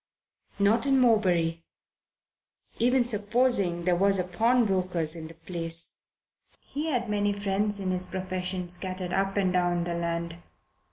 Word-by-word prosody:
Not 215 +6 +2
in 270 -1 +4
Morebury, 180 -9 +2 1.2
even 250 +1 +3
supposing 210 -5 +1
there 180 0 +2
was 195 +2 +2
a 180 - 0
pawnbroker's 185 -5 +1
in 160 -1 -7
the 165 - -13
place. 165 0 -1 0.5
He 295 +3 -5
had 245 -6 -1
many 205 -1 0
friends 200 +1 -1
in 190 -1 -2
his 185 0 0
profession, 185 -1 -4
scattered 185 0 -4
up 195 +1 0
and 190 -2 +1
down 175 -1 +1
the 170 0 -3
land. 170 0 -3
185 Hz, 135 wpm, -27 LUFS, 175-210 Hz, 1.2 s, in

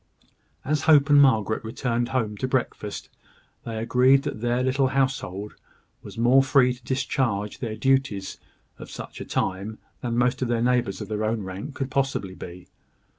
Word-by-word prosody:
As 150 +1 0
Hope 145 -1 +6
and 145 0 +8
Margaret 110 -6 +3
returned 120 +1 -2
home 115 -5 -1
to 130 - -2
breakfast, 125 -5 -3 0.6
they 115 -1 -4
agreed 125 +4 +4
that 145 -7 -5
their 120 +1 0
little 130 +1 +2
household 130 -7 -1 0.5
was - - -11
more 120 +4 +5
free 135 -1 +3
to 125 0 -16
discharge 125 -5 -1
the 115 -4 -4
duties 135 -5 0 0.4
of - - -9
such - - -8
a - - -5
time 100 +3 -2 0.2
than 120 -2 -2
most 125 +1 +1
of 130 - 0
their 120 -1 0
neighbours 125 -5 +1
of - - -5
their 110 0 -2
own 110 -1 -1
rank 95 +9 -7
could 135 -1 -4
possibly 130 -8 -1
be. 90 -1 -10
120 Hz, 170 wpm, -25 LUFS, 110-135 Hz, 0.6 s, and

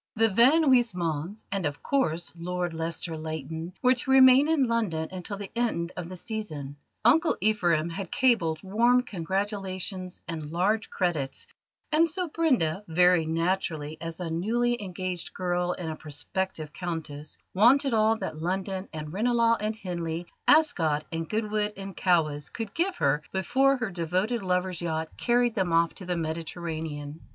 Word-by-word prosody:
The 225 0 +4
Van 250 +10 +5
Huysmans, 200 - +1
and, 195 -1 -1
of 145 0 -7
course, 175 - 0
Lord 175 0 -3
Lester 165 0 -3
Leighton, 160 +2 -5
were 255 0 +6
to 255 +1 -2
remain 265 +1 +7
in 315 -3 +3
London 215 -10 0
until 185 +2 -5
the 200 -1 -7
end 220 -8 0
of 175 -2 -5
the 185 - -7
Season. 155 -10 -5 0.3
Uncle 320 +8 +4
Ephraim 175 -7 +2
had 170 +1 -5
cabled 175 - +2
warm 235 +6 +3
congratulations 190 -1 -3
and 160 -3 -5
large 200 +6 +1
credits, 155 -8 -2 0.5
and 330 +2 +4
so 360 +2 -1
Brenda, 250 - +1
very 175 0 +4
naturally 160 -2 -1
as 165 0 -4
a 170 -2 -3
newly 235 +7 0
engaged 185 -2 -5
girl 180 -1 0
and 170 -3 -5
a - - -5
prospective 155 +1 -4
Countess, 155 -4 -5 0.2
wanted 255 +7 +5
all 220 0 +4
that 155 -8 -5
London 190 +2 -2
and 155 -1 -6
Ranelagh 230 +2 +3
and 215 +1 -2
Henley, 170 -4 -4 0.2
Ascot 170 - +3
and 165 0 -4
Goodwood 210 -1 -1
and 195 -1 -7
Cowes, 155 -5 +1
could 225 -4 -6
give 365 +2 0
her 140 +2 +1
before 270 +9 +2
her 245 -5 -3
devoted 185 +7 -1
lover's 180 -1 -1
yacht 160 -1 -2
carried 240 -1 +2
them 190 -5 0
off 165 0 +3
to 185 - -10
the 180 -1 -1
Mediterranean. 160 -2 -4
185 Hz, 155 wpm, -27 LUFS, 165-225 Hz, 0.5 s, remain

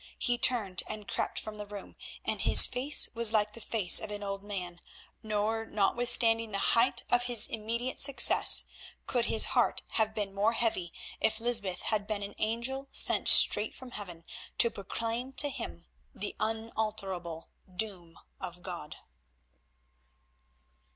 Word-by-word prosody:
He 240 0 -1
turned 210 -8 +1
and 215 -1 -9
crept - - -4
from 215 -1 -10
the 210 - -8
room, 205 -1 -11 0.3
and - - -3
his - - +9
face 260 +4 +3
was 230 -2 +1
like 210 -1 0
the 230 - -11
face 210 -5 +2
of - - -8
an 205 0 -7
old 195 -1 -6
man, 180 -4 -7 0.4
nor, 215 +1 -3
notwithstanding 225 +1 +2
the 200 - -2 0.2
height 235 +1 +1
of 245 0 +1
his 245 -3 0
immediate 230 +3 -5
success, 275 -1 +5 0.4
could 240 -2 -1
his 220 - +3
heart - - 0
have 220 -1 -2
been 205 -3 -5
more 205 +3 0
heavy 220 -7 -3 0.3
if 220 0 -1
Lysbeth 225 -6 -1
had 210 -2 -3
been 210 -2 -4
an 200 - -8
angel 235 +5 -4
sent - - +2
straight 210 +1 +7
from 260 -1 -13
Heaven 175 -7 -9 0.3
to 235 - +3
proclaim 230 +6 -6
to 290 +1 0
him - - -8 0.3
the - - -7
unalterable 215 -6 -5 0.3
doom 180 -5 -5 0.2
of 180 -1 -9
God. 170 -5 -8
215 Hz, 150 wpm, -28 LUFS, 200-235 Hz, 0.4 s, his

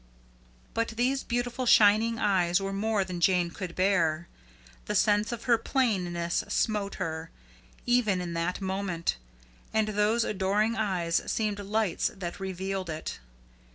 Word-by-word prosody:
But 230 0 0
those 260 +3 +1
beautiful 245 +1 -2
shining 220 +2 +5
eyes 185 -4 +2
were 195 0 -3
more 210 0 +1
than 180 -2 -6
Jane 180 -2 +3
could 180 -2 -6
bear. 170 -4 +1 0.6
The - - -2
sense 210 +2 +3
of 235 -1 -5
her 235 -3 +3
plainness 180 -10 0
smote 210 -3 0
her, 160 0 -4 0.6
even 235 -6 +2
in 175 -1 -4
that 170 +3 -2
moment; 190 - -2 0.5
and 220 -1 +1
those 215 +3 +2
adoring 210 +3 +1
eyes 185 -6 0
seemed 210 -2 -1
lights 205 -2 0
that 175 -1 -5
revealed 190 -1 -4
it. 155 - -5
200 Hz, 135 wpm, -28 LUFS, 175-220 Hz, 0.6 s, shining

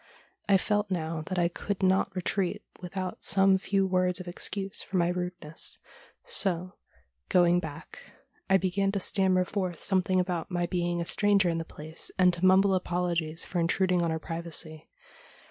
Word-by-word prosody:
I 195 - +6
felt 205 +1 -1
now 165 -3 -2
that 185 - -3
I 175 -1 +3
could 195 +3 -4
not 190 +1 +2
retreat 185 0 -1 0.2
without 185 0 -5
some 195 0 +4
few 195 0 0
words 185 -1 +1
of 185 - -8
excuse 195 +2 -2
for 190 - -4
my 170 -1 +2
rudeness, 180 -3 -1 0.5
so, 185 - 0 0.6
going 175 -1 +4
back, 160 -4 -9 0.5
I 195 - +6
began 190 +1 0
to 200 - 0
stammer 185 -1 +2
forth 180 -3 -3
something 185 -1 +2
about 180 -2 -2
my 175 -1 -1
being 175 -1 -1
a - - -3
stranger 200 -1 +2
in 165 0 -1
the 165 - -5
place, 155 +1 -5
and 180 -1 +4
to 175 - -5
mumble 190 +1 +5
apolo 180 -1 0
gies 160 0 -3
for 180 - -3
intruding 180 +1 +1
on 170 - 0
her 160 - -1
privacy. 160 -1 -4
180 Hz, 170 wpm, -28 LUFS, 170-190 Hz, 0.6 s, I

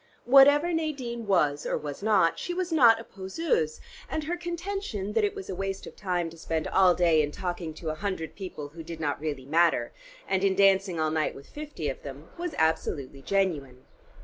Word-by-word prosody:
Whatever 285 +6 +6
Nadine 260 -8 -3
was 150 -7 +2
or - - 0
was 145 +1 -6
not, 205 -6 +3
she 350 - -4
was 360 -1 -2
not 235 -8 +6
a - - -7
poseuse, 190 - -2 0.3
and 315 - -2
her 335 +3 -2
contention 345 - -4
that - - +2
it 410 0 0
was 395 -2 -7
a - - -4
waste 195 +1 -4
of - - -10
time 180 -4 -1
to 165 - -13
spend 160 -1 -2
all 185 -2 +4
day 170 -3 +4
in 145 - -1
talking 175 0 -4
to 160 -1 -4
a 155 - -8
hundred 190 -6 -3
people 180 -7 -7
who 165 +3 -10
did 165 0 -8
not 145 -2 -2
really 145 -4 -4
matter, 160 -5 +2 0.4
and 190 0 0
in 195 -1 +3
dancing 195 -3 +3
all 155 0 +1
night 155 -1 0
with 140 - -12
fifty 295 - -6
of 135 - -4
them, 140 +3 -9
was 345 -2 -4
absolutely 145 -4 -1
genuine. 145 -9 -1
190 Hz, 200 wpm, -27 LUFS, 155-250 Hz, 0.4 s, Whatever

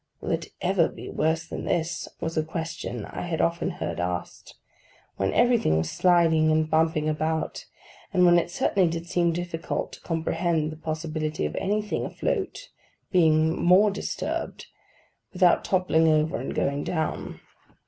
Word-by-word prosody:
'Will - - -4
it - - -1
ever - - +3
be - - -9
worse 160 +1 0
than - - -6
this?' 170 -1 -1
was 165 0 -3
a 155 - +2
question 160 - -5
I - - -7
had 170 -2 -3
often 170 +2 +1
heard 175 - -4
asked, 90 0 -4 0.6
when 95 0 0
everything 240 - +3
was 80 0 -1
sliding 165 -3 +4
and 155 0 +2
bumping 160 -1 +1
about, 155 +1 -2 0.4
and 180 -1 +4
when 175 0 +6
it 170 - -3
certainly 180 0 +2
did 165 0 -4
seem 175 -1 +1
difficult 170 -1 -3
to - - -12
comprehend 165 -1 -1
the - - -7
possibility 155 - -3
of 75 - -3
anything 210 +1 -1
afloat - - -3 0.4
being 160 -2 +3
more 190 +4 +6
disturbed, 200 - -4 0.7
without 180 -2 +4
toppling 180 -4 +2
over 155 0 +2
and 130 - -5
going 140 +1 0
down. 160 -2 -3
160 Hz, 150 wpm, -26 LUFS, 155-175 Hz, 0.7 s, when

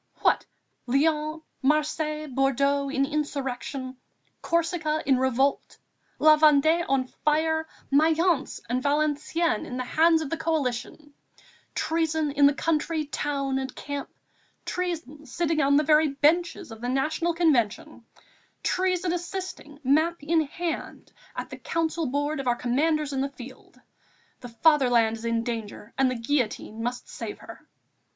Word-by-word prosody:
What! - - +2 0.4
Lyons, 305 +4 +1 0.2
Marseilles, 305 +1 0
Bordeaux 275 +1 +1
in 275 0 +1
insurrection, 275 -3 -4 0.4
Corsica 330 -2 0
in 265 -2 +3
revolt, 260 +2 0 0.4
La 310 0 +6
Vendée 310 +2 +5
on 270 -1 +2
fire, 315 +4 0 0.2
Mayence 315 +1 +2
and 245 +2 -1
Valenciennes 300 0 0
in 250 - -5
the 255 - -2
hands 320 +5 +3
of 280 - -7
the 330 - -1
Coalition, 295 -2 -2 0.6
treason 320 -2 0
in 285 0 +5
the 285 - +2
country, 315 0 0
town 275 -2 -2
and 265 0 -5
camp, 285 -1 -5 0.6
treason 330 -5 -4
sitting 325 -2 0
on 280 +1 +4
the 300 - +3
very 305 +1 +4
benches 300 +1 +1
of 225 0 -10
the 245 - -2
National 315 +6 0
Convention, 270 -11 +1 0.6
treason 365 -1 0
assisting, 350 -4 -6
map 310 +4 +2
in 320 +2 +2
hand, 335 +2 -5 0.2
at - - -6
the - - -7
council 330 -1 -1
board 290 +3 -1
of 270 - -4
our 240 - +3
Commanders 295 +4 0
in 265 - 0
the 275 - -1
field!... 255 -1 -13 0.6
The 245 - -9
fatherland 245 -4 +3
is 225 - -9
in 230 0 0
danger 225 -2 -6
and 270 -1 +3
the 255 - -2
guillotine 230 -3 -2
must 245 +1 -4
save - - -6
her!" - - -13
295 Hz, 140 wpm, -26 LUFS, 265-320 Hz, 0.6 s, La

